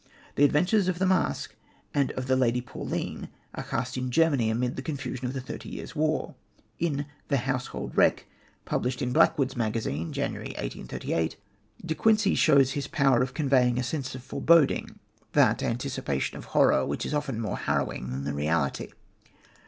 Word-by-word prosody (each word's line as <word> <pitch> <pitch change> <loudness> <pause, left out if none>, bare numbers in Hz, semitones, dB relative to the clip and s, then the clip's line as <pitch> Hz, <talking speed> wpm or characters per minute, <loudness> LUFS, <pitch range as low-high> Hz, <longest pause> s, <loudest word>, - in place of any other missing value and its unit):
The 145 - +2
adventures 180 +7 +3
of 185 -2 0
the 190 - +1
Masque 185 - +1 0.4
and 140 -2 +2
of 130 - -4
the 130 0 +2
Lady 125 -2 +2
Pauline 120 - -5 0.2
are - - -5
cast 125 +2 -3
in 130 0 -2
Germany 140 -5 +3
amid 120 +2 -1
the - - -4
confusion 130 -3 -4
of 125 - -4
the 135 - -3
Thirty 125 - -7
Years' - - -7
War. 155 0 0 0.5
In 145 -4 0 0.2
The 140 - +2
Household 125 0 -3
Wreck, - - +3 0.4
published 125 +1 -1
in 125 0 -1
Blackwood's 135 0 +3
Magazine, 110 - -2
January - - -3
1838, 80 +6 -3 0.5
De 160 - -1
Quincey 215 +2 +3
shows 135 -2 +5
his 140 0 -3
power 135 -7 +3
of 130 0 -2
conveying 130 -5 +3
a 125 - 0
sense 130 0 -3
of 130 - -8
foreboding, 165 +2 +3 0.4
that - - +4
anticipation 115 - -2
of - - -8
horror 65 - +4
which - - -2
is - - -3
often 145 -6 -1
more 110 -2 -2
harrowing 65 - -1
than 65 +2 -4
the 70 +1 -2
reality. 75 0 0
130 Hz, 170 wpm, -27 LUFS, 120-145 Hz, 0.5 s, shows